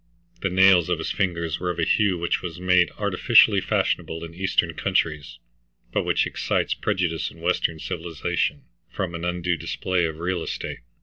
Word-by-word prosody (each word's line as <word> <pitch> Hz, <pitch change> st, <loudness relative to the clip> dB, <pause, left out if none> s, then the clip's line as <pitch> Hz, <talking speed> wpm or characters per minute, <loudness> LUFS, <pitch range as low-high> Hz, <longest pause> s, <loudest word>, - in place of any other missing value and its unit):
The 95 Hz, -, 0 dB
nails 90 Hz, -1 st, +5 dB
of 90 Hz, -, +1 dB
his 80 Hz, -, -3 dB
fingers 85 Hz, -4 st, -1 dB
were 90 Hz, -, -2 dB
of 90 Hz, -, -3 dB
a 85 Hz, -, 0 dB
hue 100 Hz, -2 st, +2 dB
which 85 Hz, 0 st, -1 dB
is 85 Hz, -2 st, -6 dB
made 90 Hz, -1 st, +3 dB
artificially 100 Hz, 0 st, +4 dB
fashionable 80 Hz, -2 st, -1 dB
in 85 Hz, 0 st, -8 dB
eastern 90 Hz, -2 st, 0 dB
countries, 80 Hz, -4 st, -1 dB, 0.6 s
but -, -, 0 dB
which -, -, +2 dB
excites -, -, -1 dB
prejudice 85 Hz, -4 st, -1 dB
in 85 Hz, -, -16 dB
western 85 Hz, -1 st, 0 dB
civilization 80 Hz, -2 st, -3 dB, 0.3 s
from 90 Hz, -3 st, -4 dB
an 85 Hz, 0 st, -5 dB
undue 90 Hz, 0 st, -1 dB
display 85 Hz, +2 st, -1 dB
of 80 Hz, -1 st, -4 dB
real 90 Hz, +1 st, -2 dB
estate. -, -, -5 dB
85 Hz, 170 wpm, -24 LUFS, 85-95 Hz, 0.6 s, nails